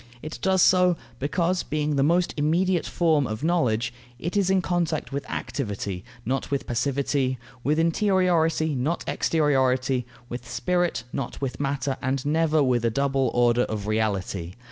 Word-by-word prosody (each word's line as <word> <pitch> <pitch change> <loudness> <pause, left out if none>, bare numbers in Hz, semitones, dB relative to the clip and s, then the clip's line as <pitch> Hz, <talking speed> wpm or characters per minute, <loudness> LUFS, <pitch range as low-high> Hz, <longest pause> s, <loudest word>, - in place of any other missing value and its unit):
It 155 +1 -6
does 190 -1 +3
so, 180 -2 +4 0.2
because, 170 +5 0
being 150 -1 -1
the 140 - +2
most 170 +5 +2
immediate 170 +4 +1
form 155 -6 +2
of 110 +4 -5
knowledge, 125 -9 +1 0.2
it 170 +9 -4
is 200 -2 +2
in 190 0 +4
contact 175 -3 -1
with 140 +1 -4
activity, 100 -7 -4 0.2
not 130 +3 -1
with 140 -1 -1
passivity; 135 +1 0 0.3
with 150 +4 +1
interiority, 165 -3 +2
not 145 +7 -1
exteriority; 130 -4 +1 0.2
with 120 -1 -7
spirit, 175 +5 0
not 135 - -4
with 130 -3 -4
matter, 135 -1 -1
and 130 +1 -1
never 155 0 +2
with 125 -3 +1
a 115 - +3
double 135 +1 +1
order 120 0 +4
of 105 -2 -4
reality. 100 -5 -1
140 Hz, 150 wpm, -25 LUFS, 125-165 Hz, 0.3 s, so